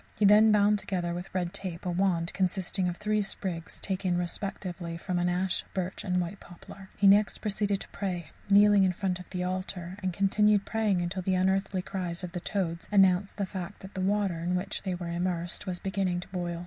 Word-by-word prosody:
He 210 - +2
then 210 +2 +7
bound 210 0 +4
together, 175 -4 -2
with 175 +2 -5
red 180 -1 -2
tape, 185 -3 -6
a 180 - 0
wand 175 -2 +1
consisting 185 0 0
of 175 - -5
three 210 0 +1
sprigs 180 -4 -4
taken, 185 -2 -1
respectively, 175 -1 -4
from 180 +1 -2
an 175 0 +1
ash, 185 +1 0
birch, 185 +2 -3
and 180 -3 +1
white 175 +3 -3
poplar. 190 +2 -13
He 200 - +1
next 205 +2 +5
proceeded 205 -1 0
to - - -6
pray, 180 -4 -4 0.2
kneeling 205 0 +6
in 185 -1 +3
front 185 0 -2
of 180 - -11
the 180 -1 -3
altar; 185 0 -4
and 185 -1 -1
continued 200 +2 +3
praying 205 -6 +1
till 190 +1 -3
the 185 +1 +1
unearthly 190 0 +1
cries 180 -2 -4
of 180 - -5
the 175 - -4
toads 170 -3 -3
announced 195 -1 +4
the 200 - 0
fact 190 0 -7
that 190 +1 -10
the 190 - -3
water, 195 -3 +1
in 175 +2 -1
which 195 +3 -2
they 190 -2 -2
were 175 -1 -5
immersed, 175 +1 -2
was 180 -1 -2
beginning 190 -2 -1
to - - -9
boil. 175 -2 -3
185 Hz, 210 wpm, -29 LUFS, 175-200 Hz, 0.2 s, then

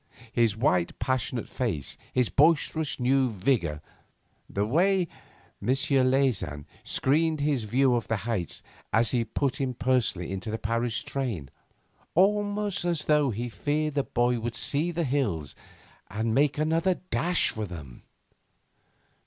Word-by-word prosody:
His 115 -3 +2
white, 90 -8 +1
passionate 125 -2 -1
face, 105 - -3 0.2
his 125 -2 +2
boisterous 155 0 +2
new 130 +1 +3
vigour, 95 - 0 0.7
the 100 +1 0
way 180 - +2 0.5
M. 100 - -6
Leysin 130 - +1 0.2
screened 155 +3 +1
his 140 -6 +1
view 130 +4 +3
of 120 -1 0
the 110 - +1
heights 105 -8 -2 0.3
as 115 +1 +3
he 120 -2 +2
put 130 +5 -2
him 130 -2 -1
personally 110 -7 0
into 95 +3 -4
the 110 - -2
Paris 115 +1 -1
train 115 - -3 0.6
almost 205 +1 +2
as 170 -3 -1
though 150 -2 +3
he 120 +2 -3
feared 150 +5 -1
the 140 - +2
boy 120 -1 +1
would 115 0 -4
see 145 +8 0
the 170 0 -1
hills 115 - -1 0.6
and 110 +2 -1
make 145 +3 +3
another 165 +4 +2 0.2
dash 175 +1 +2
for 110 -1 -4
them! 75 -9 -9
125 Hz, 135 wpm, -27 LUFS, 110-150 Hz, 0.7 s, new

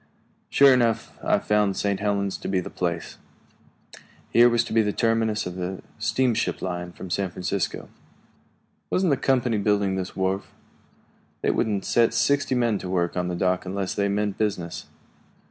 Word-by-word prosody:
Sure 140 -1 +6
enough, 120 -3 +1
I - - +3
found 105 -2 +1
St. 100 -1 0
Helens 100 -1 0
to - - -6
be 95 -1 +1
the 90 - -6
place. 85 -2 -3 1.1
Here 120 +1 +7
was 120 0 +2
to - - -6
be 115 - +5
the 105 -1 0
terminus 115 -1 +1
of 90 0 -6
the 90 +1 -4 0.2
steamship 115 +2 0
line 90 -1 -4
from 90 +1 -9
San 95 +1 0
Francisco. 90 +1 -3 1.0
"Wasn't 185 -3 +2
the - - +4
company 125 -5 +1
building 100 -1 +1
this 95 -1 -5
wharf?" 95 +1 -2 0.9
"They - - +3
wouldn't 105 -3 -1
set 115 0 +3
sixty 140 +3 +2
men 120 -4 +1
to 90 - -6
work 85 -2 0
on 90 -1 -1
the 90 - -2
dock 90 +1 0
unless 95 0 -3
they 100 0 0
meant 105 0 -1
business." 95 -6 -2
100 Hz, 165 wpm, -25 LUFS, 95-115 Hz, 1.1 s, Here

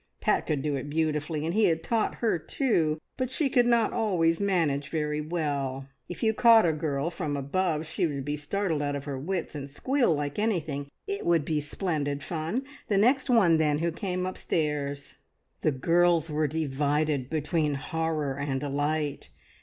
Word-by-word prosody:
Pat - - +1
could 145 -3 0
do 150 -2 0
it 140 +1 -4
beautifully, 155 0 -1
and 165 - -1
he 215 +1 +4
had 165 -1 +1
taught 225 -2 0
her 220 -7 0
too, 160 - 0 0.2
but 255 -1 -1
she 270 +1 0
could 245 -3 +4
not 235 -2 +3
always 175 -7 +2
manage 160 -8 +1
very 150 -1 -1
well. 145 -5 -2 0.2
If 175 - -6
you 220 -1 +3
caught 230 -2 +6
a 165 - +3
girl 150 0 -2
from 145 -3 -3
above, 155 +3 -1
she 160 +2 0
would 140 -3 -4
be 145 0 -1
startled 160 +2 -1
out 145 0 -1
of 140 - -4
her 140 -3 -4
wits, 175 +4 -3
and 140 -2 -6
squeal 250 - +1
like 145 +3 -3
anything. 155 -10 -1 0.2
It 400 0 -3
would 165 -4 +2
be 155 -2 0
splendid 145 -2 -2
fun. 170 +10 -2 0.2
The 200 - +2
next 255 +7 +3
one, 190 -10 +5
then, 150 -2 +2
who 170 +2 0
came 180 +1 -3
upstairs! 150 -6 -2 0.4
The 155 - +2
girls 165 +3 +2
were 150 0 +1
divided 145 -2 0
between 155 -1 0
horror 150 -1 -2
and 140 -2 -1
delight. 145 +1 -2
155 Hz, 175 wpm, -28 LUFS, 145-180 Hz, 0.4 s, caught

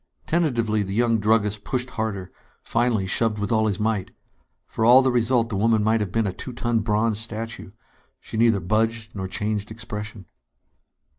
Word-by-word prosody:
Tentatively, 120 -10 +1
the 95 0 -3
young 115 -1 +2
druggist 105 -1 +1
pushed 125 0 -2
harder; 110 -5 -4 0.3
finally, 115 -4 +1
shoved 105 +3 +1
with 105 +1 -3
all 110 -1 +3
his 100 -3 -1
might. 105 -3 -1 0.6
For - - -3
all 125 +3 +7
the 130 - +2
result, 120 -1 +2
the 105 - -3
woman 110 +1 +2
might 110 +1 +2
have 100 -4 -3
been 115 +2 +1
a 95 - -2
two 125 - -7
ton 120 -1 0
bronze 105 0 +1
statue. 115 -1 -5 0.5
She - - -10
neither 115 -2 +3
budged 110 +4 -1
nor 95 -1 -3
changed 105 +1 -2
expression. 110 -3 -7
110 Hz, 170 wpm, -24 LUFS, 105-115 Hz, 0.6 s, all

